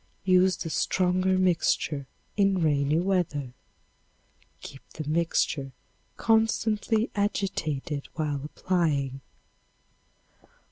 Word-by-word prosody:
Use 185 -1 +4
the 165 - -5
stronger 185 +2 +1
mixture 165 -6 +1 0.3
in 195 -2 +3
rainy 145 0 +2
weather. 170 -8 -1 1.1
Keep 135 - -10
the 155 -2 -6
mixture 155 -4 0 0.4
constantly 225 0 +1
agitated 160 -8 -2
while 150 -3 -2
applying. 150 -5 -1
170 Hz, 80 wpm, -27 LUFS, 145-190 Hz, 1.1 s, Use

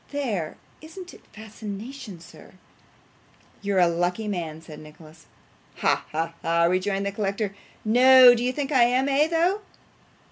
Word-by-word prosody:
There! 225 - -3 0.2
Isn't 355 +3 -11
it - - -16
fascination, 215 0 -9
sir?' - - -16 1.1
'You're 200 -1 -1
a 180 -1 +5
lucky 175 +5 -2
man,' 165 -6 -4
said 155 -2 -12
Nicholas. 155 +1 -16 0.5
'Ha, - - 0
ha, 165 +2 -3
ha!' 170 0 +1
rejoined 190 +3 0
the 200 - -2
collector. 200 0 -3 0.3
'No. 250 +2 +7
Do 240 0 -2
you 250 - 0
think 280 +2 -4
I 255 -4 +5
am 250 +2 +1
though, 325 +7 +1
eh? - - -18
210 Hz, 145 wpm, -24 LUFS, 175-260 Hz, 1.1 s, No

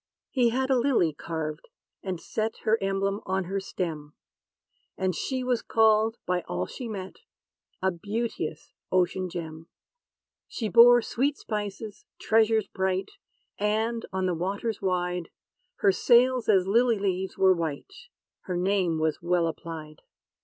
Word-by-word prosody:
He 245 -3 +3
had 260 +3 0
a 260 - +4
lily 235 - +2
carved, 155 - -5 0.3
and 185 -3 -4
set, 220 +5 -3
Her 220 +1 +2
emblem, 195 +1 -1
on 190 0 0
her 195 +3 -2
stem; 160 -6 -5 0.8
And 185 -1 0
she 255 - -2
was 250 -2 0
called, 220 0 +3
by 180 0 0
all 90 +1 -2
she 245 - -7
met, 190 -3 -6 0.7
A 190 - +3
beauteous 200 -4 -4 0.2
ocean 185 0 +1
gem. 165 -2 -7 0.8
She 220 -3 -3
bore 240 +1 +7
sweet 280 +4 0
spices, 210 0 -5
treasures 220 -1 +3
bright; 190 0 -2 0.5
And, 220 +3 0
on 190 0 -1
the 180 - +1
waters 200 +6 -3
wide, 180 -2 -1 0.5
Her 200 - +3
sails 245 +4 +3
as 190 -3 +5
lily 230 +3 +3
leaves 190 -1 -2
were 190 -1 +5
white: 165 - -4 0.5
Her 180 -2 -2
name 180 -2 +1
was 155 -1 -1
well 175 0 +1
applied. 160 -1 -6
195 Hz, 140 wpm, -27 LUFS, 175-225 Hz, 0.8 s, bore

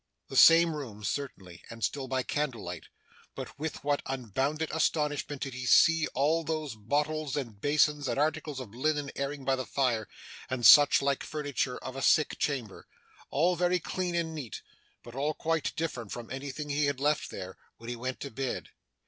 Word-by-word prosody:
The - - -7
same 165 0 +7
room 115 -8 -7
certainly, 95 - -5
and 115 -1 -8
still 135 -2 -1
by 130 0 -1
candlelight; 115 - -3 0.5
but - - -8
with 155 0 -4
what 145 0 +1
unbounded 135 +5 -2
astonishment 150 -3 0
did 135 - -5
he 125 0 -5
see 165 +3 +5
all 155 +5 +2
those 155 -3 -3
bottles, 145 +7 -1
and 115 -8 -5
basins, 150 -1 +2
and 120 - -1
articles 150 -1 -1
of 115 -5 -8
linen 145 +2 -1
airing 140 0 -4
by 135 0 +3
the 130 - -3
fire, 120 -6 0 0.4
and 125 -2 -1
such 145 +1 +8
like 140 -1 +1
furniture 145 -4 -2
of 130 - -7
a 135 - -4
sick 155 +3 +3
chamber 125 -9 -3 0.4
all 175 +5 +2
very 180 +1 +2
clean 180 +1 -3
and 165 -1 -1
neat, 140 -8 -7 0.4
but 120 - -11
all 145 +4 -1
quite 165 -2 -1
different 125 -10 -4
from 120 -1 -7
anything 140 +2 -5
he 145 +1 +1
had 140 -2 -1
left 150 0 +1
there, 95 0 -8 0.2
when 115 - -12
he 120 - -3
went 130 +2 -4
to 140 - -5
bed! 130 +2 -4
140 Hz, 180 wpm, -29 LUFS, 125-150 Hz, 0.5 s, such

